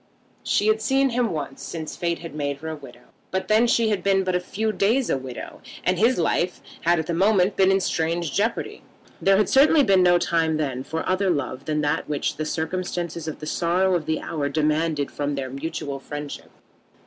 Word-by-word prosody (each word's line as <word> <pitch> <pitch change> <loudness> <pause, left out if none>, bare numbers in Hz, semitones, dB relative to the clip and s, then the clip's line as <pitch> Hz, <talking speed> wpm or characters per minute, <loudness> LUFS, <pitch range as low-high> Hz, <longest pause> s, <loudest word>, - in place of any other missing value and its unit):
She 205 - +1
had 215 0 +3
seen 270 +2 +2
him 240 -1 +1
once 145 -4 -5
since 160 -2 -6
Fate 170 -1 -1
had 165 -3 -9
made 145 -2 -2
her 160 +2 -6
a 160 - -4
widow; 135 -5 -14 0.2
but 190 0 -2
then 220 +3 +4
she 230 -1 +3
had 205 -3 0
been 195 0 +2
but 185 -1 -1
a 180 - +2
few 215 +4 -2
days 230 +6 +1
a - - +2
widow, 130 -2 -8 0.2
and 185 -1 +1
his 235 +4 +4
life 175 +1 0 0.2
had 175 +1 +3
at 160 - -1
that 170 - -2
moment 195 +2 +3
been 190 -1 +4
in 195 - +3
strange 165 -3 -1
jeopardy. 225 +3 -1 0.4
There 195 0 +4
had 210 -2 +3
certainly 290 +2 +5
been 195 -5 +4
no 175 -1 +5
time 165 -2 +1
then 135 -4 -2
for 160 +3 -4
other 190 +1 +1
love 140 -4 -2
than 150 -1 0
that 150 +1 -1
which 145 -1 -1
the 155 - -2
circumstances 170 0 -3
and 155 - -4
the 150 - -8
sorrow 180 +4 +1
of 170 -4 -1
the 160 - -1
hour 145 -3 -2
demanded 155 0 0
from 145 0 -2
their 130 -2 -4
mutual 140 -1 -4
friendship. 145 +1 -7
170 Hz, 210 wpm, -24 LUFS, 150-195 Hz, 0.4 s, certainly